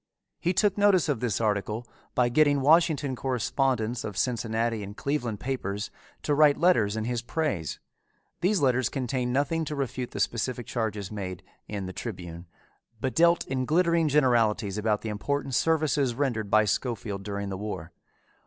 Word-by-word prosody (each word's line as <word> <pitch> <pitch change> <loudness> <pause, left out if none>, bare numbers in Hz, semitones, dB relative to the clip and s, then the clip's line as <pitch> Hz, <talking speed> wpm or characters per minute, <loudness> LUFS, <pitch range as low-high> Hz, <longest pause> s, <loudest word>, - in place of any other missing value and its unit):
He 175 - +1
took 205 +2 +2
notice 200 -5 +4
of 140 - 0
this 115 -4 -1
article 105 +1 -1 0.3
by 125 -1 +4
getting 145 +2 +3
Washington 150 -2 +3
correspondents 125 -2 0
of 105 -3 -5
Cincinnati 115 -2 0
and 100 +1 -8
Cleveland 125 -7 -2
papers 105 -6 -3 0.3
to 150 - +1
write 145 -1 +5
letters 130 - +3
in 110 - -1
his 120 +1 -2
praise. 120 - -2 0.6
Those 185 0 +2
letters 130 -3 +2
contained 125 -2 -2
nothing 145 +5 +1
to 150 - -4
refute 130 -2 -3
the - - -7
specific 120 +1 -1
charges 105 -4 -3
made 95 -4 -5 0.2
in 100 -2 -4
the 95 - -6
Tribune, 90 -6 -7 0.5
but 130 +3 -2
dealt 170 +1 +4
in 130 -1 -2
glittering 170 +1 +3
generalities 115 -8 +2
about 105 -1 +1
the 110 - -4
important 135 +6 -2
services 150 -5 +2
rendered 120 -6 -1
by 110 +1 +5
Schofield 105 -2 -2
during 100 0 -4
the 95 - -3
war. 95 -5 -5
125 Hz, 160 wpm, -27 LUFS, 105-145 Hz, 0.6 s, write